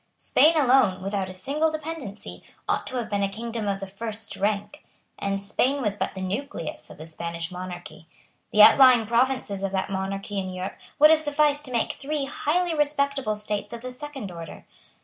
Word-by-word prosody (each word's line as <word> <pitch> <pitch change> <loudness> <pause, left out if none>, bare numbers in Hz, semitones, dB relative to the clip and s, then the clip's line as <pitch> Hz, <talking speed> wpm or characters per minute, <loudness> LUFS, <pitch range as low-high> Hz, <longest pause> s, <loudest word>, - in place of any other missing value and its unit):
Spain 320 +2 +4
alone, 255 -10 +4
without 195 -1 -2
a - - -7
single 290 +12 0
dependency, 310 -9 -7 0.3
ought - - 0
to 260 - -3
have 235 - -2
been 205 -1 -1
a 200 - +1
kingdom 225 +1 -4
of 195 -1 -1
the 195 - -5
first 210 +2 -5
rank; 205 +7 -2 0.4
and 195 0 -1
Spain 245 +8 0
was 210 -6 -1
but 190 -1 -3
the 190 - -4
nucleus 190 - -5
of - - -12
the 155 - -9
Spanish 170 +1 -5
monarchy. 180 -2 -8 0.4
The 210 - +7
outlying 255 -2 +8
provinces 235 -3 +1
of 195 - -1
that 190 0 -1
monarchy 195 +1 -3
in 185 -1 -3
Europe 185 +1 -6 0.2
would 305 +1 +8
have 320 -1 +5
sufficed 295 -1 +2
to 255 - -7
make 235 -2 0
three 290 0 -3
highly 335 +5 0
respectable 280 -6 +1
states 210 +1 -3
of 235 - -7
the 255 +1 -6
second 270 -6 -7
order. 165 -1 -9
215 Hz, 190 wpm, -25 LUFS, 195-280 Hz, 0.4 s, outlying